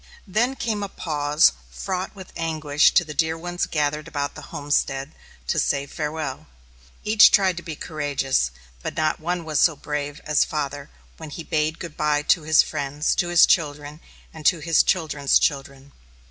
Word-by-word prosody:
Then 230 +7 0
came 220 -5 -2
a 200 - -4
pause 150 - +2 0.2
fraught 185 - -4
with 190 -2 -12
anguish 155 -2 +2
to 175 - +5
the 150 - -7
dear 160 +2 0
ones 175 +1 -3
gathered 150 0 -1
about 145 -3 -3
the - - -10
homestead 145 -1 -1 0.3
to - - 0
say 140 -1 0
farewell. 150 -1 -5 0.6
Each 215 +1 +7
tried 190 -3 +3
to - - -4
be 160 -2 -7
courageous, 145 - -1 0.3
but - - -5
not 155 0 0
one 175 +1 -3
was 155 -3 0
so 160 - +4
brave 145 0 -4
as 150 -1 +3
father 145 -2 -4 0.3
when 160 -2 -9
he 165 +3 -7
bade 155 0 -1
good 165 -3 -8
bye 150 -1 +1
to 165 - +3
his 155 0 +4
friends, 145 0 -2
to 175 - 0
his 175 -1 +6
children, 150 -2 -1 0.3
and 160 - -10
to 180 - +4
his 165 0 +3
children's 150 -6 +2
children. 140 -1 -2
155 Hz, 175 wpm, -23 LUFS, 145-170 Hz, 0.6 s, Each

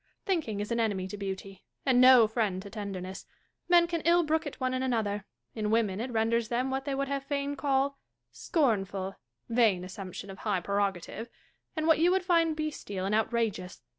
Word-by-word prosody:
Thinking 315 - -1
is 210 +3 -4
an 235 - +1
enemy 200 -5 0
to 205 - -5
beauty, 195 -1 -6 0.2
and 255 -2 +4
no 255 -3 +8
friend 215 -4 -1
to 200 - -10
tenderness. 195 -3 -6 0.4
Men 345 -1 +6
can 340 -1 -2
ill 340 +2 +4
brook 315 0 0
it 290 - -8
one 255 -1 0
in 255 - -1
another; 215 -5 -1 0.3
in 215 -2 -2
women 215 -3 +1
it 250 - -3
renders 225 0 +1
them 250 +3 -1
what 265 0 -2
they 280 -2 -1
would 275 0 -1 0.2
fain 280 0 -2
call 275 0 0 0.2
" - - -55 0.2
scornful 195 - 0 0.2
" 120 - -47
(vain 195 -6 +4
assumption 190 +1 -7
of 190 - -11
high 205 -4 0
prerogative! 200 +3 -2 0.2
) - - -46
and 315 -1 -1
what 320 -1 +5
you 340 +2 +5
would 370 0 +1
find 335 -3 +3
bestial 250 -11 -4
and 200 - -1
outrageous. 220 - -1
230 Hz, 195 wpm, -29 LUFS, 200-280 Hz, 0.4 s, no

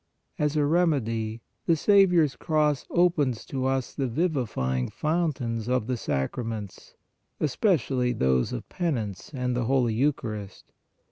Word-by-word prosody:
As 150 0 +1
a 150 -1 +3
remedy, 120 -9 +1 0.3
the 165 - +5
Saviour 190 -1 +5
s 145 -3 -1
cross 150 -3 0
opens 155 -9 +2
to 130 -1 -2
us 135 -1 -1
the 135 -2 -1
vivifying 115 - -1
fountains 140 -9 -1
of 125 -3 +1
the 125 +1 -1
sacraments, 105 - -4 0.4
especially 135 - +1
those 65 - +1
of - - -5
Penance 120 - -3
and 125 -3 -2
the 120 -1 0
Holy 125 -2 +2
Eucharist. 110 -6 -2
130 Hz, 130 wpm, -26 LUFS, 115-155 Hz, 0.4 s, the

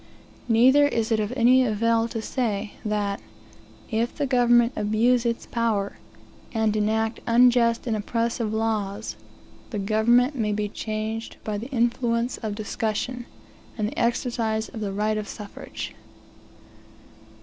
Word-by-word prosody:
Neither 260 +5 +5
is 230 -4 -1
it 220 - +3
of 210 +1 -1
any 255 +2 +5
avail 230 0 +2
to 225 -1 -5
say, 215 -5 -2
that, 205 -2 -1 0.7
if 230 +2 0
the 290 - -1
government 240 -2 +4
abuse 235 +4 +2
its 235 0 -2
power, 220 -4 -1 0.6
and 220 -1 +2
enact 220 +1 0
unjust 235 0 +4
and 230 -3 0
oppressive 230 +1 -1
laws, 220 -1 -2 0.5
the 215 - -4
government 225 +6 +3
may 215 -6 -1
be 210 0 -1
changed 220 +1 -4
by 210 -1 -3
the 240 +5 -7
influence 240 -1 0
of 215 -3 -4
discussion, 225 +3 -3 0.5
and 210 -1 0
the 290 - -6
exercise 230 -2 0
of 225 - -8
the 205 -2 -2
right 215 +2 0
of 210 - -5
suffrage. 210 -2 -7
225 Hz, 135 wpm, -25 LUFS, 215-240 Hz, 0.7 s, Neither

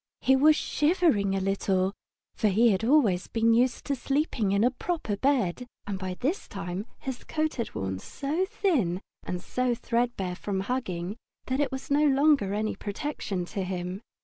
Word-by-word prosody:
He 265 - +5
was 300 +3 +6
shivering 300 - +2
a - - +1
little, 195 0 +1 0.4
for 215 - +1
he 220 +4 +4
had 195 +2 0
always 225 -9 +3
been 230 0 +2
used 240 +1 +2
to 280 - 0
sleeping 270 -6 0
in 200 +2 +3
a 245 - +4
proper 305 - -2
bed, 250 -2 +1 0.2
and 200 -2 -4
by 185 -1 -4
this 285 - -2
time 195 +2 -5
his 265 -2 -6
coat 310 0 -1
had 235 - -4
worn 95 -1 -2
so 290 - -2
thin 315 - 0 0.2
and 180 - -4
threadbare 240 -6 -1
from 195 -1 -2
hugging 195 -4 -3 0.3
that 260 +1 -1
it 285 -3 +1
was 265 +1 -6
no 290 +2 +4
longer 275 -7 +3
any 215 +1 -1
protection 205 -5 -4
to 195 - -1
him. 180 +1 -4
230 Hz, 170 wpm, -28 LUFS, 195-275 Hz, 0.4 s, was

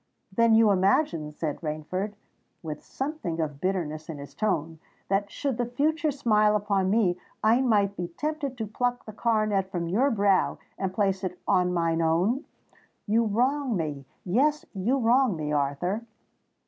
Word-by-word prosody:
"Then 230 -1 +5
you 220 -2 +6
imagine," 185 - +2
said 150 -1 -4
Rainford, 165 +6 -3 0.5
with 155 -2 -6
something 270 - -4
of 150 -3 -3
bitterness 165 -5 -2
in 160 - -5
his 140 0 -10
tone, 165 -7 -1 0.3
"that 200 +1 +1
should 270 +2 -2
the 240 - +1
future 300 +5 +1
smile 215 -7 +3
upon 200 -2 +1
me, 190 -4 +2 0.2
I 225 +4 +4
might 205 -5 +2
be 175 -2 -3
tempted 285 - -4
to 225 - -2
pluck 245 +3 -2
the 215 - -8
coronet 215 -4 +1
from 175 -3 -3
your 235 +11 +2
brow 200 -5 +2 0.2
to 195 - 0
place 195 0 0
it 180 -1 -3
on 180 -1 +3
mine 165 -1 +1
own? 180 - +1 0.6
You 225 +2 +2
wrong 250 +3 +1
me—yes, 175 - -1
you 215 +7 +1
wrong 245 -2 +3
me, 150 -1 -3
Arthur!" 145 +9 0
200 Hz, 155 wpm, -27 LUFS, 170-235 Hz, 0.6 s, you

